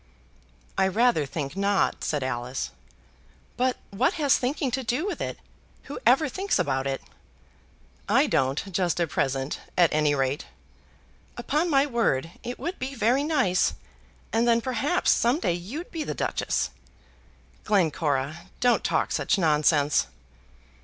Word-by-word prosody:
"I 190 - +4
rather 200 - +2
think 140 +2 -4
not," 200 0 +1
said 145 -3 -1
Alice. 125 0 -3 0.8
"But 255 +1 +1
what 225 +7 +1
has 290 -4 +3
thinking 260 +1 -1
to 265 +2 -1
do 250 - -1
with 410 - -3
it? - - -3 0.5
Who - - -7
ever 310 - +5
thinks 385 +8 -1
about 135 -1 0
it?" 135 -1 -3 1.1
"I - - +5
don't 135 +9 0
just 180 0 0
at 170 -3 0
present, 135 +1 -1 0.2
at 175 -2 +5
any 150 -1 +2
rate." 135 +2 -1 0.9
"Upon 310 +5 0
my 275 -2 +4
word 225 - 0
it 245 +1 -5
would 350 +3 -5
be 265 +2 -4
very 250 +4 +2
nice; 265 - +2 0.6
and 230 +2 +2
then 230 -1 +4
perhaps 265 +8 +1
some 245 +6 +2
day 180 - +1
you'd 220 - -6
be 325 -2 -3
the - - -4
Duchess." - - -1 0.9
"Glencora, 155 -6 0
don't 245 -1 +3
talk - - 0
such - - +1
nonsense." 150 - +3
195 Hz, 140 wpm, -26 LUFS, -, 1.1 s, ever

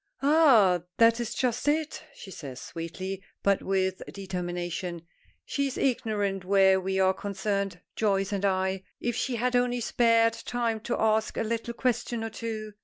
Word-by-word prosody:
"Ah! 260 - +5 0.2
that 230 0 +5
is 235 -2 -3
just 250 +1 -1
it," 310 +1 0
she 190 - -11
says, 140 -8 -8
sweetly, 185 +4 -6 0.2
but 200 -1 +3
with 190 -1 0
determination. 175 -2 -4 0.4
"She 280 -1 -1
is 265 - -5
ignorant 205 -7 0
where 190 0 +4
we 190 +1 -1
are 190 0 +4
concerned 195 -1 -3
Joyce 195 -2 +1
and 200 -1 -2
I. 190 -1 +1 0.2
If 240 -1 -2
she 250 0 -1
had 250 +2 0
only 245 0 +2
spared 230 -1 +3
time 230 -1 -2
to 240 - -1
ask 220 0 +1
a - - +1
little 230 +1 -3
question 240 -2 -1
or 225 - -4
two! 215 -2 -5
210 Hz, 160 wpm, -28 LUFS, 190-235 Hz, 0.4 s, Ah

